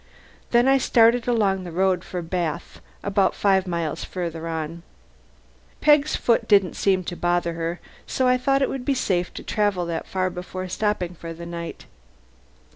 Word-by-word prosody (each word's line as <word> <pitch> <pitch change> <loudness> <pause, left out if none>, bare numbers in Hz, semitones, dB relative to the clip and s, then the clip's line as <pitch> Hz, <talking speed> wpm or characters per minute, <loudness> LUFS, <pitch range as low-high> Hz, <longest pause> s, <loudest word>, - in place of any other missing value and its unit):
Then 240 +1 +4
I 270 0 +5
started 235 -1 +4
along 200 -6 +1
the 175 - -7
road 185 +1 +1
for 180 -1 -5
Bath 170 -1 -3 0.2
about 200 -1 +2
five 190 -2 +2
miles 170 -2 -2
farther 165 -2 -5
on. 165 +1 -4 1.0
Peg's 295 0 +4
foot 235 - +1
didn't 200 -4 +4
seem 190 -2 +1
to 175 - -5
bother 175 -1 0
her 165 +1 -3 0.3
so 260 - +1
I 250 - +5
thought 275 +1 +2
it - - +1
would 265 -2 -4
be 275 +1 +1
safe 180 -8 0
to - - -7
travel 205 -4 0
that 170 -1 -4
far 185 -1 -1
before 185 +1 -6
stopping 185 -3 -1
for 165 -1 -8
the 170 +1 -8
night. 170 -1 -7
185 Hz, 170 wpm, -23 LUFS, 170-220 Hz, 1.0 s, I